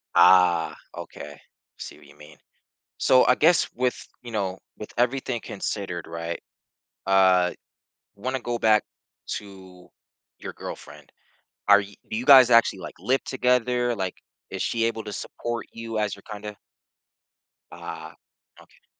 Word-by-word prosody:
Ah, 90 -3 +5 0.2
okay, - - -9 0.4
see - - -9
what - - -18
you - - -18
mean. 75 -1 -15 0.6
So, 130 -1 +5
I 125 - +5
guess 170 +3 +4
with, 125 0 0 0.3
you 120 -1 -9
know, 95 -3 -2 0.2
with 105 - -9
everything 125 -1 0
considered, 95 -4 -5
right? 85 +1 -5 0.6
Uh, 95 -2 +4 0.6
wanna 130 +5 -3
go 120 -1 -3
back 110 -1 +4 0.5
to 95 -3 -13 0.5
your - - -7
girlfriend, - - -10 0.6
are 100 0 +8
y 100 0 -8
do 110 - -3
you 125 - -4
guys 130 -3 +9
actually, 115 -5 +4
like, - - -8
live 130 +1 0
together? 125 -1 +1
Like, 95 -2 -3 0.3
is - - -5
she 115 -1 0
able 115 -1 -2
to 105 - -6
support 120 +2 -5
you 115 -1 -6
as 105 -1 -1
your 100 - -17
kinda 105 0 -7 1.2
Ah. - - -8 0.4
Okay. - - -22
105 Hz, 140 wpm, -25 LUFS, 95-120 Hz, 1.2 s, guys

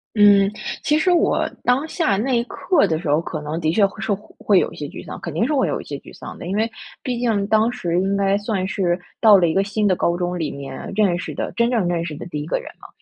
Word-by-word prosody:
嗯， 200 -1 +6 0.3
其 300 - +3
实 360 +4 +2
我 345 - +2 0.2
当 260 +5 +2
下 315 - 0
那 255 +6 0
一 - - 0
刻 295 - +1
的 160 -3 0
时 165 - -6
候， 150 +2 +3
可 155 -2 -5
能 150 +2 -4
的 155 0 +1
确 200 +4 +4
会 195 +2 -5
受 215 -1 0
会 205 0 0
有 - - -1
一 - - -11
些 145 - -5
沮 - - -9
丧。 - - -7
肯 170 - -5
定 170 +8 +1
是 300 - 0
会 270 -3 +2
有 - - -1
一 - - -8
些 145 - -6
沮 - - -14
丧 - - -9
的， - - -8
因 190 - -2
为 220 +2 +1 0.3
毕 245 -2 -2
竟 225 -5 +1
当 220 +2 +3
时 175 -8 -3
应 195 +1 0
该 195 0 +2
算 205 -3 -2
是 185 -2 0 0.2
到 215 -3 +8
了 175 -2 +3
一 160 - 0
个 195 - +2
新 205 +1 0
的 185 - +3
高 170 0 0
中 180 0 -2
里 160 -4 -2
面 140 -1 -7
认 195 -5 +3
识 - - -5
的 - - -3
真 235 0 +2
正 225 -8 +1
认 170 -1 0
识 155 -3 -5
的 145 - -8
第 150 -4 -4
1 - - -5
个 - - 0
人 - - -9
嘛。 - - -11
195 Hz, 305 characters per minute, -21 LUFS, 170-225 Hz, 0.3 s, 到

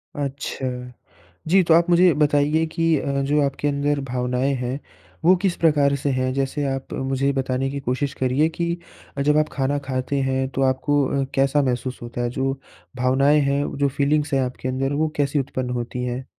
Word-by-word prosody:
अच्छा, 140 -1 -4 0.8
जी, 190 +3 +5
तो 165 -2 +4
आप 170 +1 +4
मुझे 175 +1 +6
ये 175 - +6
बताइए 150 +2 +3
कि 165 0 +1
अ, 140 0 -1
जो 145 +2 +2
आपके 140 +1 -1
अंदर 145 0 0
भावनाएँ 125 +2 0
हैं 125 +2 -2 0.5
वो 180 +3 +7
किस 190 -3 +1
प्रकार 145 -4 +3
से 140 +1 -2
हैं? 130 0 0
जैसे 135 +2 -1
आप 135 0 -6
मुझे 135 0 -1
ये 140 - +3
बताने 135 0 -1
की 140 0 -4
कोशिश 135 +2 -2
करिए 130 +4 +1
कि 170 +1 -2 0.4
जब 150 +2 +3
आप 155 - +2
खाना 140 +1 0
खाते 130 +1 -2
हैं 130 0 0
तो 135 0 -2
आपको 135 +2 +2 0.2
अ, - - 0
कैसा 135 +2 +3
महसूस 125 -1 -2
होता 120 +1 -6
है? 120 - -1
जो 135 +2 -2 0.4
भावनाएँ 135 +4 +3
हैं, 140 0 +1
वो - - -5
जो 140 0 +2
फीलिंग्स 145 +2 0
हैं 135 - +3
आपके 125 0 -4
अंदर 135 +2 -1
वो 160 - +2
कैसी 145 +1 +1
उत्पन्न 130 -2 -3
होती 125 +1 -5
हैं? 125 +1 -4
140 Hz, 200 wpm, -22 LUFS, 130-145 Hz, 0.8 s, वो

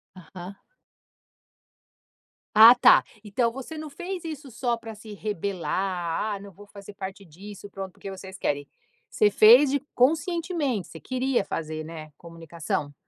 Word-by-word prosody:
Aham. 185 +1 -10 2.0
Ah 225 +3 +10
tá. 245 - +6 0.2
Então 230 +3 0
você 270 +5 -8
não 305 -1 -7
fez 355 +4 -6
isso 300 -5 -7
só 235 0 -1
para 225 -1 -9
se 215 0 -11
rebelar, 195 -1 -2
"Ah - - -8
não 200 0 -11
vou 205 +3 -16
fazer 200 0 -12
parte 195 0 -8
disso, 200 +5 -11
pronto, 195 -1 -7
porque 195 - -9
vocês 190 0 -10
querem". 145 -4 -2 0.4
Você 210 - +3
fez 245 +7 +7
de 285 - +1 0.2
conscientemente, 310 - 0
você 160 - -11
queria 255 -2 -1
fazer, 155 -2 -5
né, 155 -1 -9
comunicação? 165 -3 -5
205 Hz, 140 wpm, -25 LUFS, 180-255 Hz, 2.0 s, Ah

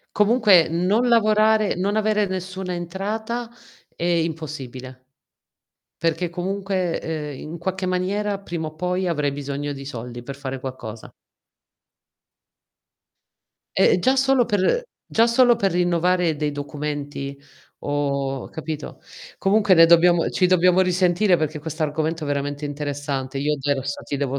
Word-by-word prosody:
Comunque 210 -5 +5
non 190 +9 +1
lavorare 215 -2 +3
non 195 +4 -1
avere 215 -1 +2
nessuna 185 0 -4
entrata 215 +7 -4 0.5
è - - -4
impossibile, 150 -7 -3 0.9
perché 165 +2 -1
comunque, 185 0 -2
ehm, 150 -4 -5
in 160 +3 -7
qualche 190 +2 -3
maniera, 195 +3 -1
prima 170 -5 -4
o 155 - -10
poi, 180 +3 -1
avrai 150 -4 0
bisogno 140 +1 -4
di 135 -1 -7
soldi 120 -2 -7
per 140 +2 -7
fare 135 -1 -5
qualcosa. 120 -4 -7 2.7
Ehm, - - +5
eh, - - +2
già 260 +9 +2
solo 265 -1 +3
per 210 - +1 0.2
già 225 +1 +3
solo 240 0 +5
per 195 -4 0
rinnovare 175 -1 +1
dei 150 0 -1
documenti 145 -1 -5 0.5
o 140 -2 -2
capito? 155 -1 -6 0.4
Comunque 205 0 +4
ne 165 -1 +8
dobbiamo 170 0 +5
ci 185 - +2
dobbiamo 180 0 +4
risentire 180 +1 +3
perché 155 -1 -2
questo 160 +1 -5
argomento 155 +2 -1
è - - -5
veramente 145 +1 -2
interessante. 145 -2 -4
Io 150 +2 0
adesso 140 0 -2
ti 140 - -4
devo 140 -1 -2
170 Hz, 135 wpm, -22 LUFS, 145-190 Hz, 2.7 s, ne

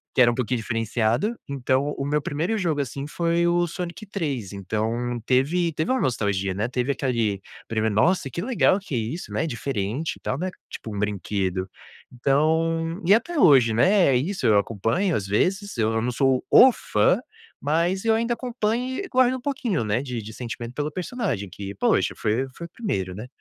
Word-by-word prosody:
que 130 - +5
era 120 - +7
um - - -3
pouquinho 125 -1 -1
diferenciado, 115 - 0
então 140 +1 0
o 135 - -2
meu 150 +1 +1
1º 165 +11 -1
jogo, 165 -6 0
assim, 140 +1 -5
foi 170 +2 +1
o 175 0 +2
Sonic 175 +4 -6
3, 145 - -3
então 110 +5 -2
teve 160 +7 +2
teve 155 +9 -1
uma 260 - +2
nostalgia, 100 -6 0
né, 105 +4 -1
teve 125 +2 0
aquele 115 -7 -1 0.3
primeiro: 110 -1 0
"Nossa, 170 - +2
que 170 - -4
legal 220 -4 +2
que 190 -8 -6
isso, 120 +9 -4
né, - - 0
diferente 120 +2 -3
e - - -22
tal, 130 - -2
né", 185 +5 -2 0.2
tipo 110 - -7
um 100 - -3
brinquedo. 95 -2 -2 0.4
Então 160 - +1
e 195 - +6
até 335 +10 +1
hoje, 130 - +6
né, 185 - +4
é 135 - +4
isso, 165 +2 -2
eu 105 - +5
acompanho, 115 - 0
às 100 -2 -2
vezes, 190 - 0
eu 110 -1 +2
não 110 - 0
não 125 - 0
sou 130 +1 +1
o 260 - +8
fã, - - +1 0.4
mas 170 +7 0
eu 225 - +4
ainda 235 +2 0
acompanho 245 +1 -2
e - - -6
guardo 255 0 +3
um 250 - -11
pouquinho, 250 - -1
né, 105 +3 0
de 125 -4 -4
de 110 +1 -9
sentimento 120 0 -6
pelo 150 +2 -2
personagem 180 - -3
que, 100 +2 -7
poxa, - - +2
foi 120 +5 0
foi 170 - -7
o - - -32
1º, 95 - -2
né. 110 +5 -7
135 Hz, 190 wpm, -24 LUFS, 110-180 Hz, 0.4 s, o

